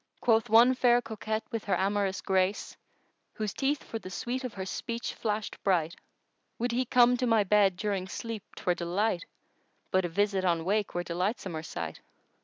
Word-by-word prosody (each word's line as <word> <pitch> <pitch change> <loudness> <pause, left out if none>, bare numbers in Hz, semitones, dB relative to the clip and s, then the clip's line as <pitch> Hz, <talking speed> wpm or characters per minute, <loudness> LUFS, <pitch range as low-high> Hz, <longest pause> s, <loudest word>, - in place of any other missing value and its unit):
Quoth 225 -2 +2
one 235 +4 +7
fair 245 -1 +4
coquette 220 -1 -4
with 230 -3 -3
her 200 - +1
amorous 195 0 0
grace 190 +1 0 0.3
* - - -45
Whose 215 -3 -3
teeth 280 +1 0
for 225 - -5
the 185 - -9
sweet 250 +6 -3
of 250 -4 -5
her 190 -1 -4
speech 230 +4 -4
flashèd 215 -1 -3
bright:— 170 -4 +1 0.6
Would 240 +1 -1
he 250 +2 0
come 245 +1 +5
to 250 0 0
my 225 -2 +4
bed 200 -2 +3
during 195 -2 -2
sleep 225 +1 -5
'twere 180 - 0
delight 175 +2 -1 0.3
* - - -43
But 185 -1 +2
a - - -2
visit 200 +2 +1
on 170 -3 +1
wake 205 +1 0
were 175 - 0
delightsomer 180 -2 -2
sight! 85 - -6
205 Hz, 185 wpm, -29 LUFS, 185-230 Hz, 0.6 s, one